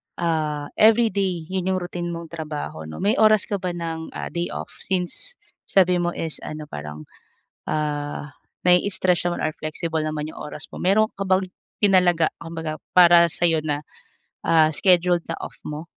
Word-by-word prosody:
ah, 155 -3 -1
everyday 205 -6 +3
'yon 190 -1 -1
yung 190 0 +1
routine 175 -1 -4
mong 170 -1 -6
trabaho 150 - -5
'no, 80 - -7
may 205 +3 +3
oras 215 -2 +5
ka 200 -2 -3
ba 180 -1 -3
ng, 165 -1 -4
ah, - - -5
day 170 0 -2
off - - -6
since 190 - -2 0.3
sabi 180 -2 +4
mo 175 0 -1
is 160 -2 -4
ano 155 0 -6
parang, 75 +1 -7 0.6
ah, 145 -1 -3 0.3
nai-stretch 180 -1 +3
or - - -4 0.2
flexible 160 +1 -3
naman 155 -1 -3
yung - - -10
oras 150 -1 -8
mo, - - -11
mayro'n 215 +4 +3
ka 195 - -3
bang 190 0 +2 0.3
tinalaga 180 -5 +4
kumbaga 160 -1 -5 0.2
para 175 -1 +8
sa'yo 165 -1 +1
na, 145 -2 -1 0.6
ah, 160 -1 +5
scheduled 175 +1 +3
na - - -4
off - - -7
mo? 150 +2 -6
170 Hz, 160 wpm, -23 LUFS, 155-185 Hz, 0.6 s, para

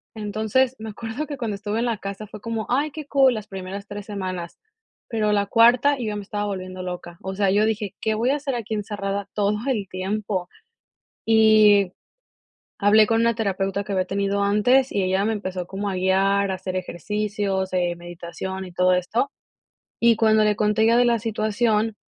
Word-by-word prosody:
Entonces, 220 +5 0
me 220 - -6
acuerdo 230 +7 -5
que 285 -2 -5
cuando 225 -4 -3
estuve 205 +2 -3
en 240 - 0
la 230 -2 -1
casa 200 +1 -6
fue 210 - -10
como: 225 -1 -3
"Ay, 285 +5 +1
qué 305 0 -7
cool", 270 -3 +4
las 215 -2 -6
primeras 195 0 -7
3 205 0 -7
semanas, 185 -4 -5 0.5
pero 215 -3 0
la 200 -1 +2
cuarta, 245 +6 +5
yo 245 - -4
ya 210 - -2
me 205 - -5
estaba 205 +1 -3
volviendo 185 -2 -5
loca. 175 -1 -7
O 190 0 -5
sea, 200 -1 +2
yo 205 +2 +3
dije: 210 -3 -2
"¿Qué 220 0 0
voy 235 +4 +1
a - - +2
hacer 275 -3 -3
aquí 225 -2 -3
encerrada 200 -1 -3
todo 205 0 +1
el 215 -7 -1
tiempo?". 190 0 -3 0.8
Y 215 -3 +5 0.9
hablé 210 +1 +5
con 225 +1 +2
una 230 0 +3
terapeuta 195 -2 -1
que 200 - -5
había 185 -1 +1
tenido 200 +1 -1
antes, 245 +6 +3
y 200 - 0
ella 190 +2 +1
me 225 - +1
empezó 185 -3 -4
como 195 +2 -4
a 195 - -2
guiar, 195 +2 +2
a 190 - 0
hacer 185 0 -5
ejercicios, 195 +1 -2
eh, 175 -1 +1
meditación 175 +2 -7
y 180 - -11
todo 180 +1 +3
esto, 210 +10 0 0.7
Y 235 0 +5
cuando 220 -1 +4
le 210 -1 +2
conté 210 +1 +2
ya 230 +1 +4
de 245 - +5
la 235 -1 +2
situación, 220 0 0
205 Hz, 195 wpm, -23 LUFS, 190-225 Hz, 0.9 s, cuarta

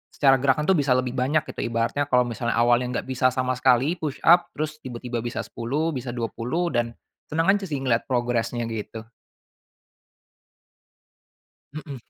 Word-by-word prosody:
secara 135 -2 +4
gerakan 140 +2 +2
tuh 190 - +4
bisa 135 -3 +2
lebih 130 -1 -1
banyak 140 +5 +1
gitu - - -9
ibaratnya 115 +5 -1
kalau 125 -2 +4
misalnya 120 0 -2
awalnya 120 +1 +3
enggak - - -5
bisa 130 0 +2
sama 130 -1 0
sekali 130 +4 +3
push-up 165 +3 +3
terus 155 0 -4
tiba-tiba 120 -1 -5
bisa 120 +1 -4
10, 145 +8 -2
bisa 130 -2 -5
20, 125 +9 -2
dan 115 -1 -1 0.3
senang 165 +4 +1
aja 205 -1 -1
sih 145 - -2
ngelihat 120 -3 +1
progresnya 120 -1 0
gitu. 110 0 -6 2.7
Heeh. 145 -3 -7
130 Hz, 150 wpm, -24 LUFS, 120-145 Hz, 2.7 s, secara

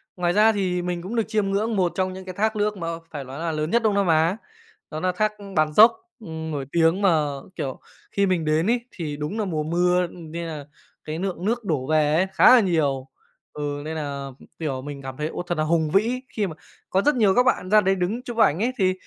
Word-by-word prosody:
ngoài 175 -1 0
ra 215 +2 +5
thì 185 -4 -1
mình 175 -1 -3
cũng 200 +7 -6
được 225 - +2
chiêm 210 -3 0
ngưỡng 215 +3 0
một 180 -3 +2
trong 185 0 -1
những 190 0 -9
cái 185 - -6
thác 220 +1 +1
nước 210 -1 0
mà 165 -2 -4 0.2
phải 145 -3 -6
lói 135 +4 -8
là 165 -1 -2
lớn 155 +1 -2
nhất 235 0 +2
Đông 215 -2 +3
Nam 200 -2 +1
Á, 165 +5 +3 0.5
đó 155 - -4
nà 185 +1 +1
thác 215 +4 0 0.2
Bản 155 -1 +2
Giốc, 220 +6 +8 0.3
ừm, 160 -5 -6
nổi 140 -2 -3
tiếng, 170 +3 +3
mà, 165 -6 +3 0.3
kiểu, 135 -5 -4 0.3
khi 200 - +2
mình 180 -4 0
đến 155 +5 +1
ấy 240 0 +2
thì 150 -4 -5
đúng 150 +9 -4
nà 215 - -1
mùa 155 -5 -2
mưa, 180 +3 +2
ừm, 165 -2 -11
nên 170 0 -4
là 150 -3 -6 0.4
cái 155 +2 -5
lượng 185 -1 -3
nước 235 +1 0
đổ 145 -8 -2
về 155 -1 +2
ấy 185 +3 +2
khá 190 +8 +7
là - - +7
nhiều. 145 -8 0 0.5
Ừ, 145 -1 -4
nên 160 +1 -4
nà, 140 -2 -4 0.3
kiểu, 135 -5 -3
mình 140 0 -7
cảm 130 -1 -7
thấy, 150 0 -2
ô, - - -5
thật 175 0 -3
nà 155 - 0
hùng 160 -1 +1
vĩ. 235 +6 +2 0.2
Khi 205 -2 +1
mà 160 - -7 0.3
có 190 - +2
rất 295 +3 +2
nhiều 210 -4 +3
các 250 - +5
bạn 220 -7 +1
ra 215 0 +6
đấy 190 0 +2
đứng 200 +7 -2
chụp 240 -2 -7
ảnh 165 -6 +4
ấy 240 +4 +1
thì, 185 -2 +2
175 Hz, 250 wpm, -24 LUFS, 155-200 Hz, 0.5 s, Giốc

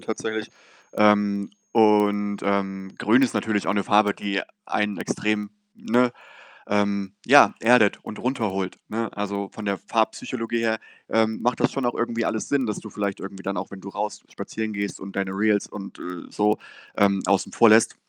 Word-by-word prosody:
tatsächlich. 110 0 -4 0.4
Ähm, 105 -1 +3 0.2
und, 105 -2 +3
ähm, 95 -1 -1
grün 120 +5 +4
ist 125 - +1
natürlich 105 -1 0
auch - - +2
'ne 100 - 0
Farbe, 105 0 +4
die 100 -1 -2 0.2
einen 105 -1 -1
extrem, 105 -1 -1 0.2
ne, 125 - +2 0.6
ähm, 100 -1 0
ja, - - +7
erdet 115 -3 +5
und 105 - -8
runterholt, 100 -7 -2
ne? 115 0 -2
Also 100 -1 -3
von 110 - -8
der 100 -1 -1
Farbpsychologie 115 +1 -1
her, 110 -1 0 0.3
ähm, 110 0 +1
macht 125 0 0
das - - +2
schon 135 - -3
auch 120 - 0
irgendwie 115 -1 -1
alles 110 - -2
Sinn, 135 -4 +1
dass 105 - -2
du 110 - -10
vielleicht 100 -2 -3
irgendwie 95 0 -8
dann 100 0 -3
auch - - -5
wenn 100 -1 -9
du 100 - -8
raus 105 +2 -4
spazieren 110 -1 -5
gehst 100 0 -3
und 95 0 -9
deine 95 -1 -1
Reels 105 +1 +1
und, 100 -2 -9
äh, 90 -1 -7
so, 105 +1 +1 0.4
ähm, 100 -1 +2
außen 100 0 +1
vor 115 - +6
lässt, 110 +1 +5
105 Hz, 180 wpm, -24 LUFS, 100-110 Hz, 0.6 s, ja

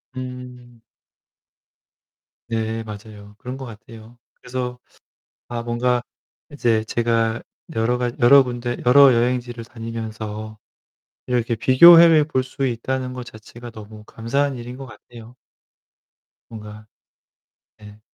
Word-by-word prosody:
음. 125 -2 -9 1.7
네, 115 0 -2
맞아요. 105 -1 -11
그런 125 +1 -7
것 135 - -7
같아요. 115 +1 -13 0.2
그래서 125 -1 -6 0.7
아 120 -1 -4
뭔가 120 +1 0 0.5
이제 115 -6 +1
제가 115 -1 0 0.4
여러 115 +2 +1
가 125 -1 -1
여러 135 +3 +7
군데 120 -1 -4
여러 135 0 +7
여행지를 120 0 -1
다니면서 110 -2 -7 0.7
이렇게 120 -2 0
비교해 165 +6 +7
볼 130 -3 -1
수 130 +1 -4
있다는 130 +1 -3
것 125 -1 -7
자체가 120 +1 -12
너무 110 -1 -12
감사한 135 +5 -2
일인 125 +1 -8
것 135 - -8
같아요. 120 0 -14 1.1
뭔가 105 -1 -10 0.9
네. 105 0 -14
120 Hz, 220 characters per minute, -21 LUFS, 110-125 Hz, 1.7 s, 여러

